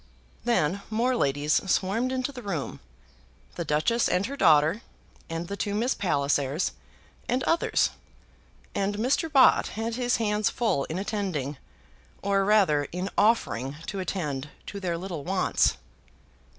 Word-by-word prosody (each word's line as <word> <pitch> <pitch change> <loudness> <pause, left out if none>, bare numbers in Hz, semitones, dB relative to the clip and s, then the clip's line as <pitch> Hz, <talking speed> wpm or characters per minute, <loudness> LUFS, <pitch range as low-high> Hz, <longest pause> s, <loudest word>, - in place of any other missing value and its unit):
Then 200 -5 +1
more 240 +4 +1
ladies 145 - +1 0.2
swarmed 220 +9 +1
into 260 +1 -1
the 255 -3 -8
room, 185 - -4 0.7
the 170 - -3
Duchess 160 +10 +1
and 180 +2 +1
her 275 - -4
daughter, 160 - +4 0.5
and 165 +1 -4
the 200 - -4
two 205 0 -2
Miss 235 +5 +1
Pallisers, 145 -4 0 0.6
and 255 +1 +1
others; 330 - +2 0.8
and 200 +1 -1
Mr. 270 +8 +1
Bott 270 -3 +6
had 225 +1 -2
his 245 -1 +1
hands 210 -2 +1
full 220 - 0
in 160 - -4
attending, 185 -9 -2 0.7
or 195 0 +2
rather 195 -8 +3
in 180 +5 -4
offering 140 - +2
to 200 - -4
attend, 150 -7 -3 0.2
to 200 - -6
their 175 -3 -2
little 175 -4 -5
wants. 185 +3 +1
195 Hz, 135 wpm, -27 LUFS, 155-225 Hz, 0.8 s, Bott